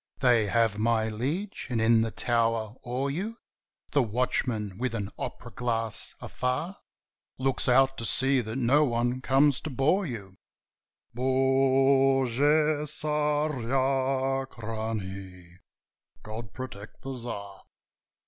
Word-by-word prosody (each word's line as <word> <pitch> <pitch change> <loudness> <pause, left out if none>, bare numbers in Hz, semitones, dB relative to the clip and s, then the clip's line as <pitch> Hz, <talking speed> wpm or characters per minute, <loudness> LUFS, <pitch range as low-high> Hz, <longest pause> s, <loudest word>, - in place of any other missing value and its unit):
"They 120 -5 +3
have, 110 -1 +2
my 110 0 +2
liege, 150 - -3
and 120 -3 -1
in 110 0 +4
the 115 - 0
tower 115 -2 0
o'er 130 +3 -2
you 205 +10 -4 0.5
The 145 - +3
watchman, 110 -3 -1
with 125 -2 -1
an 100 -3 -4
opera - - -6
glass, 115 0 -1
afar 130 +10 -3 0.6
Looks 130 0 +1
out 135 +1 +4
to 115 - -2
see 135 +2 +4
that 110 0 -5
no 135 +4 +3
one 120 -1 0
comes 135 +1 +3
to - - -5
bore 155 +8 +1
you: 100 -7 -8 0.8
Bogu 135 0 +3 0.6
Tsarachnie! 130 - -1 0.7
God 110 -1 -7
protect 110 -4 -9
the 135 0 -5
Tsar!" 100 -5 -6
125 Hz, 110 wpm, -27 LUFS, 110-135 Hz, 0.8 s, in